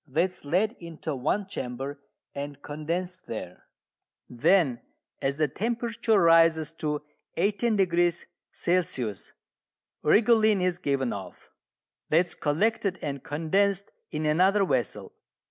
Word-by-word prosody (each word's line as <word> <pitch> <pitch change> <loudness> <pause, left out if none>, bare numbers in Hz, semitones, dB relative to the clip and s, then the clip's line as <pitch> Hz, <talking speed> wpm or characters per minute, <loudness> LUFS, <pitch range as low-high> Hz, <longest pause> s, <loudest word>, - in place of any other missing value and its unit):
That 165 +7 +1
is - - -11
led 185 +9 +2
into 165 -3 -5
one 155 +10 0
chamber 135 -4 -5 0.3
and 140 0 -6
condensed 175 +5 -4
there. 90 -5 -7 0.6
Then, 125 0 +2 0.4
as 135 +1 0
the 155 -1 +2
temperature 230 - 0
rises 165 -2 +5
to 150 -1 -1 0.3
18° 185 -4 +2 0.3
C., - - -3 1.3
rhigolene 215 +3 +4
is 180 -1 0
given 135 -6 0
off: 95 -3 -9 0.6
that 165 +4 +4
is - - -8
collected 195 +5 0
and 140 -2 -4
condensed 195 +6 0 0.2
in 155 0 -3
another 190 +6 +4
vessel. 125 - -2
165 Hz, 110 wpm, -27 LUFS, 145-195 Hz, 1.3 s, rises